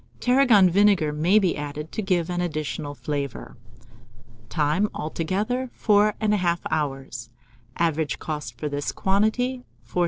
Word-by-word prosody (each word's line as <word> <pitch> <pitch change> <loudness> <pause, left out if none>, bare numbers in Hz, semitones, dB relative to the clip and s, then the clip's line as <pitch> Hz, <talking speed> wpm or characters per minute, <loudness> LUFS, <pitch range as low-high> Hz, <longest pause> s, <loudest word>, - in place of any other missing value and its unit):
Tarragon 245 -6 +5
vinegar 185 -4 +3
may 170 +7 +3
be 190 -5 +2
added 150 +1 -6
to - - -3
give 180 -3 0
an 175 0 -1
additional 155 -3 -3
flavour. 140 +1 -5 0.9
Time. 160 +6 +1
Altogether 200 +11 -2
4 210 -1 +3
1/2 195 -6 +1
hours. 135 -5 -3 0.5
Average 160 -2 0
cost 150 -7 -5
for 150 - -3
this 145 0 -2
quantity, 220 +6 0 0.2
4s. - - -3
170 Hz, 125 wpm, -24 LUFS, 150-210 Hz, 0.9 s, Tarragon